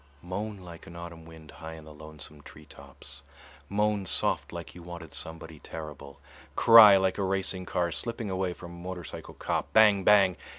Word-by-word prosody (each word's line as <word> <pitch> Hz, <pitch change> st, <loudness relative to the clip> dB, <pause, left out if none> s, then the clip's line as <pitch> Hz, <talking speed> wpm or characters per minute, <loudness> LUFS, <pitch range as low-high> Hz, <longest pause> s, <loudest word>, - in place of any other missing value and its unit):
Moan 100 Hz, +4 st, -5 dB
like 85 Hz, -3 st, -12 dB
an 85 Hz, -, -11 dB
autumn 85 Hz, -1 st, -9 dB
wind 80 Hz, -2 st, -13 dB
high 80 Hz, -1 st, -9 dB
in 80 Hz, -1 st, -12 dB
the 75 Hz, -, -12 dB
lonesome 75 Hz, -1 st, -11 dB
tree 75 Hz, +1 st, -14 dB
tops, 70 Hz, -1 st, -13 dB, 0.5 s
moan 105 Hz, 0 st, 0 dB
soft 95 Hz, -, -1 dB
like 85 Hz, -1 st, -8 dB
you 90 Hz, -, -12 dB
wanted 85 Hz, -3 st, -10 dB
somebody 80 Hz, 0 st, -7 dB
terrible, 75 Hz, -4 st, -9 dB, 0.4 s
cry 110 Hz, -4 st, +9 dB
like 95 Hz, +1 st, 0 dB
a -, -, 0 dB
racing 95 Hz, -1 st, -2 dB
car 85 Hz, -1 st, -1 dB
slipping 115 Hz, +2 st, -4 dB
away 95 Hz, -1 st, -1 dB
from 90 Hz, 0 st, -10 dB
a 85 Hz, 0 st, -11 dB
motorcycle 90 Hz, -2 st, -8 dB
cop, -, -, -3 dB
bang 105 Hz, -3 st, +5 dB
bang! 95 Hz, -2 st, +5 dB
85 Hz, 175 wpm, -28 LUFS, 80-95 Hz, 0.5 s, cry